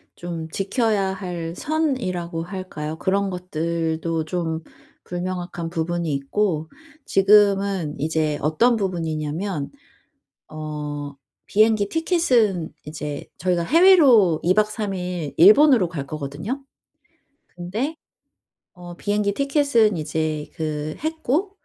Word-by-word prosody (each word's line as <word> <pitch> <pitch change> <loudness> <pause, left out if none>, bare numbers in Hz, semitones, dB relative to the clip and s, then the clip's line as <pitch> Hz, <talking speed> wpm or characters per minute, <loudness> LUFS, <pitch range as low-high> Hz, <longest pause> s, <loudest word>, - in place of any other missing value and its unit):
좀 170 -2 -6
지켜야 200 +1 0
할 175 -3 -5
선이라고 190 - -2
할까요? 170 -4 -6
그런 195 +1 +1
것들도 165 -2 -2
좀 165 -1 -2 0.4
불명확한 175 -1 -4
부분이 170 -1 -2
있고 160 +3 -1 0.4
지금은 195 -4 +3
이제 155 -1 0
어떤 230 - +3
부분이냐면 165 -3 -3 0.8
어 150 -2 -6 0.3
비행기 215 -1 +3
티켓은 250 - +1
이제 150 -1 -6
저희가 175 0 0
해외로 270 - +6
2 180 +2 +4
박 215 +1 +3
3 210 -2 -3
일 180 -6 -4
일본으로 215 - +7
갈 145 -5 -5
거거든요. 155 - -5 1.0
근데 220 - -3 0.8
어 175 -1 -10
비행기 205 +1 0
티켓은 275 - +2
이제 155 0 -2
그 155 -2 -3
했고 320 +4 -1
180 Hz, 220 characters per minute, -22 LUFS, 160-210 Hz, 1.0 s, 일본으로